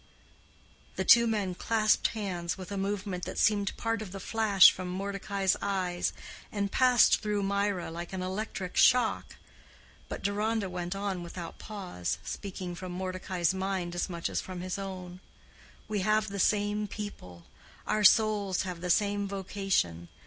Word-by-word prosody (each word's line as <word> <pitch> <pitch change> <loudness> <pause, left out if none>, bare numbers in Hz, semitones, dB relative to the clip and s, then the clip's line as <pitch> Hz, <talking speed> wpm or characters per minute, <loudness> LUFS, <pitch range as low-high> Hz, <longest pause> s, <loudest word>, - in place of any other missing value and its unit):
The - - -2
two 235 0 +7
men 205 -5 0
clasped 215 +3 +2
hands 185 -6 -3
with 185 +1 -8
a - - -3
movement 195 -2 -3
that - - -6
seemed 205 -1 +2
part 225 -1 -1
of 205 -4 -7
the 195 - -6
flash 205 -2 +6
from 185 0 -6
Mordecai's 195 +1 -1
eyes, 185 -3 -1 0.4
and 200 -1 -2
passed 250 -3 +5
through 210 -1 -1
Mirah 200 -3 -1
like 170 +1 -6
an 185 -1 -3
electric 190 0 -4
shock. 250 -3 +3 0.7
But - - -6
Deronda 205 0 0
went 180 +1 -3
on 195 -2 -2
without 170 0 -8
pause, 185 - -4
speaking 185 -3 -5
from 180 +1 -7
Mordecai's 185 -1 -1
mind 190 -2 -2
as 175 +2 -2
much 170 -2 -3
as - - -2
from 185 -1 -7
his 185 +2 -4
own, 185 -2 -7 0.7
"We 215 -1 -1
have 215 +2 +2
the 200 0 -5
same 210 +1 +1
people. 90 - -8 0.4
Our 215 - 0
souls 205 -3 +4
have 180 -2 -6
the 180 - -3
same 205 +2 +2
vocation. 190 - -1
195 Hz, 155 wpm, -30 LUFS, 180-205 Hz, 0.7 s, two